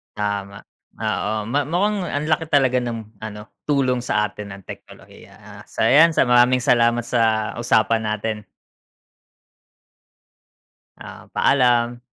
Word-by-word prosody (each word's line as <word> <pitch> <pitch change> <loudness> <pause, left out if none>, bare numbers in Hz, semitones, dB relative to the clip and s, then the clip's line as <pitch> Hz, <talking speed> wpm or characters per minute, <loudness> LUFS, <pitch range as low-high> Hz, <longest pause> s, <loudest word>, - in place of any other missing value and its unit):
Tama 100 -1 -4 0.3
oo, 105 0 -2
ma 140 +7 0
mukhang 200 +5 0
ang 145 +1 -2
laki 155 0 -1
talaga 130 -3 +2
ng 115 -3 -7
ano, 105 -1 -8 0.2
tulong 130 -3 +1
sa 105 -3 0
atin 105 0 -8
ng 100 - -15
teknolohiya - - -13
ah, - - -14
so, - - -2
'yan 160 +4 +6
sa - - +3
maraming 125 +1 +4
salamat 120 -2 +2
sa 110 -3 0
usapan 115 -1 +2
natin. 105 -1 -4 2.5
Ah, - - -12
paalam. 120 -2 +2
120 Hz, 125 wpm, -21 LUFS, 105-130 Hz, 2.5 s, yan